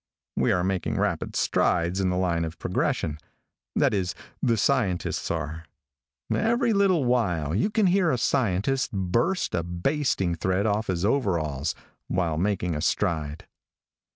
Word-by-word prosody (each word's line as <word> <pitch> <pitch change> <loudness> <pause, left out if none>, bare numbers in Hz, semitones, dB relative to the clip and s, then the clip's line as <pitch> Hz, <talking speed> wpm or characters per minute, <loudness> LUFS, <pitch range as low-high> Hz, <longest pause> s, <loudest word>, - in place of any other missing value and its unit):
We - - +2
are 90 - +1
making 95 -1 -1
rapid - - -1
strides 85 +3 +1
in 95 - +1
the 90 - 0
line 85 -2 +1
of 80 0 -5
progression. 75 0 -1 0.6
That - - +3
is, 95 -3 -1 0.3
the 115 -2 +2
scientists 105 -7 0
are. 80 0 -3 0.7
Every 235 +1 +2
little 190 -8 +3
while 90 -12 +1
you 110 - +1
can 215 -1 +2
hear 185 -1 +3
a 130 - +1
scientist 120 +1 +1
burst 105 - 0
a 85 - +1
basting 90 - 0
thread 95 +4 0
off 110 0 0
his 90 0 -1
overalls, 85 - 0 0.3
while 85 -4 0
making 90 -2 0
a 75 - -3
stride. 80 -5 -1
95 Hz, 145 wpm, -26 LUFS, 85-125 Hz, 0.7 s, That